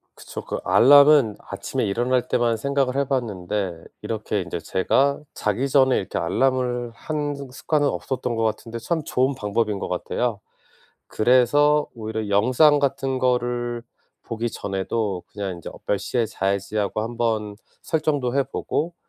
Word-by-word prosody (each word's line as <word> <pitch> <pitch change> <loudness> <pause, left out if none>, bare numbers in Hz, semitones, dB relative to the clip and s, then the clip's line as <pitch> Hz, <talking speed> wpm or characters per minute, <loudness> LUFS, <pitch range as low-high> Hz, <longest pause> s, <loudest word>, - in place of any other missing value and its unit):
그쵸. - - -8
그 - - -4
알람은 140 -3 +6
아침에 100 +6 -4
일어날 120 +5 0
때만 120 -1 +2
생각을 135 +2 0
해 140 - +3
봤는데 100 -8 -2 0.2
이렇게 - - -2
인제 - - -5
제가 140 +9 +1
자기 110 +6 -1
전에 130 -2 +4
이렇게 95 - -2
알람을 125 +5 0
하는 145 +3 -3 0.2
습관은 145 +2 0
없었던 130 -3 -3
것 115 - 0
같은데 115 +1 -3
참 160 +7 -2
좋은 130 +1 +1
방법인 105 -2 -1
것 - - -4
같아요. 105 +4 -2 0.7
그래서 145 +6 +3
오히려 110 -2 -4
영상 130 +9 +4
같은 135 -1 0
거를 120 -1 0 0.4
보기 115 0 -3
전에도 95 -1 -3
그냥 100 -2 -4
인제 85 - -8
어 - - -12
몇 100 - +1
시에 115 +4 -1
자야지 100 0 -2
하고 105 +1 0
한번 110 -3 -2 0.3
설정도 145 -6 0
해 140 - +4
보고 155 +5 -3
120 Hz, 310 characters per minute, -23 LUFS, 105-135 Hz, 0.7 s, 알람은